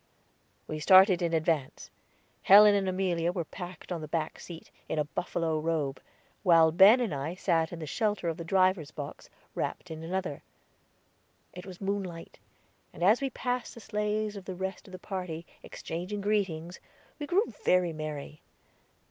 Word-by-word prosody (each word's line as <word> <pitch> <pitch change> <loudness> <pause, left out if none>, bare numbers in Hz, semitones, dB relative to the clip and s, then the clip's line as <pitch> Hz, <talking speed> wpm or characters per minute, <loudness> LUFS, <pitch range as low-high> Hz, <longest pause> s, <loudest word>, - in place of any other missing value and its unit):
We 155 - -5
started 185 +3 +6
in 170 -1 0
advance. 160 -4 -1 0.5
Helen 205 +2 +8
and 195 -2 +1
Amelia 180 -2 0
were 175 -2 -3
packed 175 +2 -9
on 170 -2 -3
the 155 - -6
back 155 0 -3
seat, 170 -2 -11 0.2
in - - -2
a 150 - +2
buffalo 160 +1 -2
robe, 155 -4 -2 0.4
while 165 -4 +5
Ben 195 +9 +7
and 230 -9 -1
I 145 +5 -4
sat 165 -4 0
in 170 - -6
the 160 - -6
shelter 205 +5 -1
of 165 -1 -2
the 170 - -6
driver's 185 -3 +2
box, 145 -2 -8 0.2
wrapped - - -4
in 160 0 -7
another. 180 -3 -3 1.1
It 180 +2 -10
was 185 -2 -10
moonlight, 195 -4 -4 0.5
and 170 - -7
as 215 +8 +5
we 275 - 0
passed 250 -1 -3
the - - -10
sleighs 210 0 -2
of 195 -2 -9
the 185 - -6
rest 190 +2 -5
of - - -13
the 185 - -7
party, 180 -4 -6 0.2
exchanging 180 +5 -6
greetings, 185 -5 -1 0.4
we 295 - -5
grew 390 +8 +1
very 180 -2 +3
merry. 155 -1 -6
180 Hz, 165 wpm, -29 LUFS, 160-195 Hz, 1.1 s, Helen